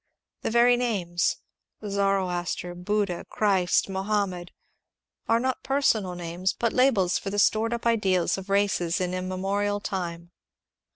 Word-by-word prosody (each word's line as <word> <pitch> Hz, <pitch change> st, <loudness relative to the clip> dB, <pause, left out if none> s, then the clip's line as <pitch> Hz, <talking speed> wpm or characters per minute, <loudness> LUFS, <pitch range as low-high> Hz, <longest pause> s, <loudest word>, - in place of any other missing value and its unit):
The -, -, -2 dB
very 240 Hz, +2 st, +5 dB
names 190 Hz, -8 st, 0 dB, 0.2 s
— 215 Hz, -, -13 dB
Zoroaster, 190 Hz, -3 st, -1 dB
Buddha, 185 Hz, 0 st, -1 dB
Christ, 190 Hz, -4 st, +2 dB
Mohammed 190 Hz, -2 st, -2 dB, 0.4 s
— -, -, -42 dB
are 230 Hz, 0 st, +4 dB
not 260 Hz, +1 st, -1 dB
personal 220 Hz, -9 st, +1 dB
names, 175 Hz, +2 st, -2 dB
but 235 Hz, -1 st, 0 dB
labels 230 Hz, -9 st, +3 dB
for 195 Hz, -, -5 dB
the 205 Hz, -, -4 dB
stored 220 Hz, +2 st, +3 dB
up 235 Hz, 0 st, -3 dB
ideals 195 Hz, -7 st, +2 dB
of 195 Hz, 0 st, -8 dB
races 195 Hz, -4 st, +1 dB
in 180 Hz, -1 st, -1 dB
immemorial 195 Hz, +3 st, -1 dB
time. 175 Hz, -4 st, -5 dB
195 Hz, 135 wpm, -26 LUFS, 180-215 Hz, 0.4 s, very